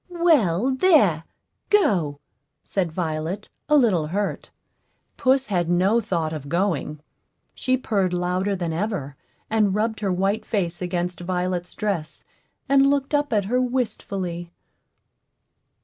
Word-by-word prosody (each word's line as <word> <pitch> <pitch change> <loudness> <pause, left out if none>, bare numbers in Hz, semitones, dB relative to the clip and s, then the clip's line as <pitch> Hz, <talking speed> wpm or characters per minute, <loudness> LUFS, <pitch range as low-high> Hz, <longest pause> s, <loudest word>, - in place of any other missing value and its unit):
"Well, 270 - +3
there 260 - +4 0.4
go," 185 - +2 0.4
said 180 -4 -1
Violet, 165 +4 -3 0.2
a 300 - +6
little 190 - +3
hurt. 200 +5 -3 0.7
Puss 265 +1 +2
had 175 -6 -1
no 190 +6 +3
thought 170 -7 -2
of 145 -3 -6
going; 165 -4 -1 0.5
she 255 -1 0
purred 200 -7 0
louder 180 +3 0
than 170 -3 -3
ever, 170 -7 -3 0.3
and 210 -3 +2
rubbed 220 +1 0
her 200 -3 -1
white 195 +4 0
face 175 -6 -2
against 180 0 -2
Violet's 180 0 -2
dress, 195 -8 -3 0.4
and 275 0 +5
looked 280 0 0
up 290 -1 +1
at 205 -3 +1
her 250 +5 +1
wistfully. 200 -8 -3
195 Hz, 125 wpm, -23 LUFS, 175-230 Hz, 0.7 s, a